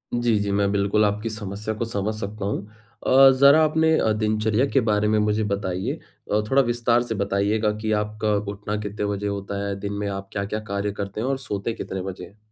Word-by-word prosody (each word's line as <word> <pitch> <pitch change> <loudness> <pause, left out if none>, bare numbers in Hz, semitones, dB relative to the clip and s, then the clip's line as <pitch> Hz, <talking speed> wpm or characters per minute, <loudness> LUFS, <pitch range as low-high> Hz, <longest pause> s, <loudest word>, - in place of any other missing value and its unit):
जी, 120 -3 +2
जी। 100 0 -1
मैं 100 0 +2
बिल्कुल 100 +1 +2
आपकी 105 +2 -1
समस्या 105 0 -4
को - - +1
समझ 110 -1 -2
सकता 100 0 -5
हूँ 100 0 -2 0.4
अ, 135 +1 +8
ज़रा 140 +3 +7
अपने 160 +1 +2
अ, 110 - +2
दिनचर्या 110 +3 +1
के 135 - +3
बारे 105 0 +2
में 110 0 +2
मुझे 105 +1 +1
बताइए? 95 -2 -2 0.4
अ, 105 - +3
थोड़ा 135 +1 +5
विस्तार 120 -1 +2
से 115 -2 -4
बताइएगा 100 +2 +1
कि 110 - -1
आपका 105 0 -2 0.2
उठना 105 +1 -4
कितने 105 0 -3
बजे 100 0 -2
होता 100 0 -3
है? 100 - -2
दिन 100 0 -4
में 100 0 -3
आप 95 0 -6
क्या-क्या 100 +1 -3
कार्य 100 +1 -1
करते 100 +1 -5
हैं 125 - -1
और 135 -1 0
सोते 105 +2 -2
कितने 95 -3 -5
बजे 90 -1 -6
हैं? 100 - -19
105 Hz, 210 wpm, -24 LUFS, 100-110 Hz, 0.4 s, अ